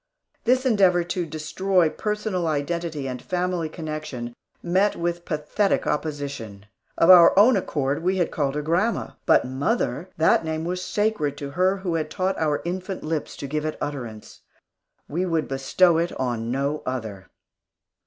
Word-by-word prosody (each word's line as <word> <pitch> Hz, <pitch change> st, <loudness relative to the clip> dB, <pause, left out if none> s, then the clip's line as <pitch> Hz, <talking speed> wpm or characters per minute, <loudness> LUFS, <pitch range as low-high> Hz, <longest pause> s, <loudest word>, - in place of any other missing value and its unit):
This 255 Hz, +2 st, +3 dB
endeavor 190 Hz, -7 st, +4 dB
to 175 Hz, 0 st, -3 dB
destroy 165 Hz, +4 st, +1 dB
personal 210 Hz, -1 st, -2 dB
identity 155 Hz, -1 st, -2 dB
and 125 Hz, -1 st, -5 dB
family 180 Hz, -2 st, -2 dB
connection, 155 Hz, -7 st, -6 dB, 0.3 s
met 190 Hz, +4 st, +2 dB
with 170 Hz, 0 st, -3 dB
pathetic 155 Hz, +6 st, 0 dB
opposition. 140 Hz, -10 st, -4 dB, 0.3 s
Of 165 Hz, -, +7 dB
our 175 Hz, 0 st, +8 dB
own 225 Hz, +5 st, +7 dB
accord, 145 Hz, -7 st, -1 dB
we 185 Hz, +2 st, +1 dB
had 175 Hz, -, 0 dB
called 140 Hz, -2 st, -1 dB
her 150 Hz, -, -2 dB
grandma. 180 Hz, +9 st, 0 dB, 0.2 s
But -, -, +5 dB
"mother" 140 Hz, -, -1 dB
that 160 Hz, +1 st, +4 dB
name 160 Hz, 0 st, -3 dB
was 180 Hz, +1 st, -2 dB
sacred 205 Hz, -11 st, -1 dB
to 140 Hz, -1 st, -6 dB
her 185 Hz, +5 st, +2 dB
who 185 Hz, -3 st, -3 dB
had 155 Hz, -2 st, -1 dB
taught 190 Hz, +2 st, -1 dB
our 150 Hz, -2 st, 0 dB
infant 185 Hz, +2 st, -4 dB
lips 155 Hz, -1 st, -3 dB
to 140 Hz, -, -5 dB
give 150 Hz, +2 st, -2 dB
it 155 Hz, 0 st, -3 dB
utterance! 120 Hz, -7 st, -6 dB, 0.7 s
We 175 Hz, +5 st, -1 dB
would 165 Hz, -2 st, 0 dB
bestow 160 Hz, +6 st, +3 dB
it 170 Hz, +1 st, 0 dB
on 120 Hz, -3 st, -2 dB
no 140 Hz, +4 st, -1 dB
other. 110 Hz, -7 st, -5 dB
160 Hz, 155 wpm, -24 LUFS, 145-185 Hz, 0.7 s, our